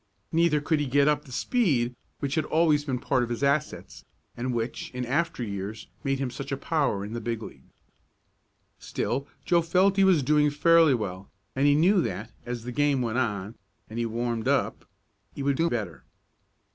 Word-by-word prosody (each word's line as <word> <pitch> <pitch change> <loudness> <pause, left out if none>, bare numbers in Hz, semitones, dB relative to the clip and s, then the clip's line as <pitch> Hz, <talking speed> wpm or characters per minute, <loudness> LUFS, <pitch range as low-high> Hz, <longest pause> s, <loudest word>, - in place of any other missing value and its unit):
Neither 165 -2 +3
could 150 +1 +1
he 145 - -1
get 140 +2 +3
up 150 0 +1
the 130 - -13
speed 125 - +1 0.3
which 140 -1 -2
had 155 0 0
always 155 -2 +3
been 130 -4 -1
part 130 +1 0
of 120 - -2
his 120 +3 -3
assets, 140 +1 -1 0.3
and 125 +2 -2
which, 115 0 -3
in 125 0 -2
after 165 +1 -1
years, 100 +1 -5
made 135 -1 0
him 130 -2 -2
such 140 +2 -7
a 135 - -1
power 140 -10 0
in 105 - -7
the 120 - -4
big 115 0 -3
league. - - -12 1.1
Still 140 +1 -3 0.2
Joe 175 -1 +4
felt 185 +4 +3
that 195 - +2
he - - +6
was 180 -7 +4
doing 150 +2 +3
fairly 160 0 +5
well, 100 -4 -5 0.3
and 135 +2 +3
he 145 - +5
knew 180 +5 +4
that, 110 - -4 0.2
as 120 -1 -4
the 125 - -5
game 140 0 +1
went 115 +1 -1
on, 105 -4 -2 0.4
and 115 - -4
he 120 - 0
warmed 115 0 -2
up, - - 0 0.5
he 140 - -4
would 140 0 +2
do 165 +4 +1
better. 100 - -4
135 Hz, 195 wpm, -27 LUFS, 120-150 Hz, 1.1 s, he